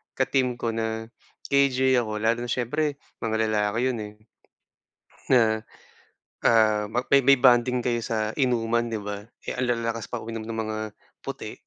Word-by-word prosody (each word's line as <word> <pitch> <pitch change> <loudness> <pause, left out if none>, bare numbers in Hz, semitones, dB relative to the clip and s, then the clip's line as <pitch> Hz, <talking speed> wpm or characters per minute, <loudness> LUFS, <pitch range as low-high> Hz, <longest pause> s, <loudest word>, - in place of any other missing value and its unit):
ka-team 130 -2 +1
ko 115 -1 -2
na 110 0 -3 0.4
KJ 130 -2 +4
ako, 110 -2 -3
lalo 115 +2 +2
na 120 - -7
siyempre, 145 +4 -1 0.3
mga 110 -1 0
lalaki 105 +1 0
'yon, 120 -3 -3
eh. 105 0 -9 1.2
Na, 110 -4 +4 0.9
ah, 110 -2 +4
ma 120 +4 -1
may 140 - +8
may 140 0 +7
bonding 125 -1 +4
kayo 120 -1 +1
sa 110 -1 -1
inuman, 120 -2 +1
'di 110 -2 -3
ba, 105 0 -6 0.2
eh, - - -3
ang 130 - +1
lalakas 115 -2 -1
pa 120 - -5
uminom 115 0 -6
ng 115 0 -5
mga 110 0 -4 0.5
puti. - - -6
115 Hz, 160 wpm, -25 LUFS, 110-125 Hz, 1.2 s, may